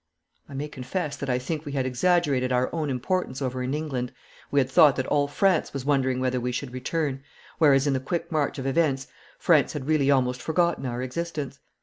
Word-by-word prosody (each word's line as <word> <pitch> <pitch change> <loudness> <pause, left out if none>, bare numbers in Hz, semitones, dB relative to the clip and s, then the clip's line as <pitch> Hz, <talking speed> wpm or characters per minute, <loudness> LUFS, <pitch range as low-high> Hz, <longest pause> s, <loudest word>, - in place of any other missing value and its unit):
I 140 - -9
may 145 +2 -3
confess 145 +3 -4
that 140 - -4
I 125 - +2
think 150 +4 -4
we 145 -3 -6
had 135 -2 0
exaggerated 130 -1 +2
our 125 0 +1
own 155 -3 -1
importance 130 +2 -1
over 130 -2 -2
in 130 +3 -1
England. 135 -5 -3 0.4
We 145 - +2
had 130 - +2
thought 135 +1 +6
that 130 - -1
all 145 0 +2
France 185 +3 +1
was 135 -2 -4
wondering 130 -3 +1
whether 130 0 0
we 125 +1 -1
should 125 +1 -4
return, 135 +1 -2 0.4
whereas 140 -3 +5
in 145 - +2
the 130 - +1
quick 170 +7 -3
march 150 -2 0
of 135 - -5
events 135 -1 +1 0.3
France 155 -5 +3
had 145 -4 -5
really 150 -3 +2
almost 125 -2 +2
forgotten 170 -3 0
our 120 +1 -3
existence. 140 0 -4
140 Hz, 210 wpm, -26 LUFS, 130-155 Hz, 0.4 s, thought